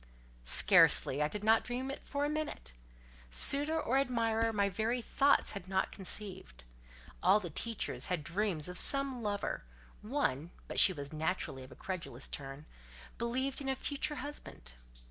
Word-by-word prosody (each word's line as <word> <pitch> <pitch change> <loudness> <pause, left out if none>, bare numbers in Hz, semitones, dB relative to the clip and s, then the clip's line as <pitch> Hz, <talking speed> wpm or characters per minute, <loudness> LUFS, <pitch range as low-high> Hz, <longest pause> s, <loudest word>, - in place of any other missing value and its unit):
Scarcely: 135 - +6
I 150 - +2
did 210 +6 -6
not 220 +1 +3
dream 255 +2 -4
it 275 - -9
for 285 +1 -3
a - - 0
moment. 300 - -5 0.6
Suitor 290 - +3
or 265 -2 0
admirer 230 -4 0
my 200 -2 0
very 220 +5 -2
thoughts 275 +4 +1
had 195 -3 -8
not 190 0 -1
conceived. 185 - -3 0.6
All 190 +4 +4
the 175 -5 -8
teachers 230 +7 -2
had 180 -4 -3
dreams 175 -2 -2
of 180 0 +5
some 275 -3 +3
lover; 205 - -3 0.4
one 210 - -2 0.2
(but - - -2
she 195 - +8
was 145 -4 -8
naturally 155 -4 -3
of 130 - -14
a - - -12
credulous 170 -9 -6
turn) 140 +1 -8 0.5
believed 260 +4 -2
in 270 - -4
a 265 - 0
future 295 +3 -3
husband. 260 - -8
210 Hz, 160 wpm, -32 LUFS, 170-265 Hz, 0.6 s, she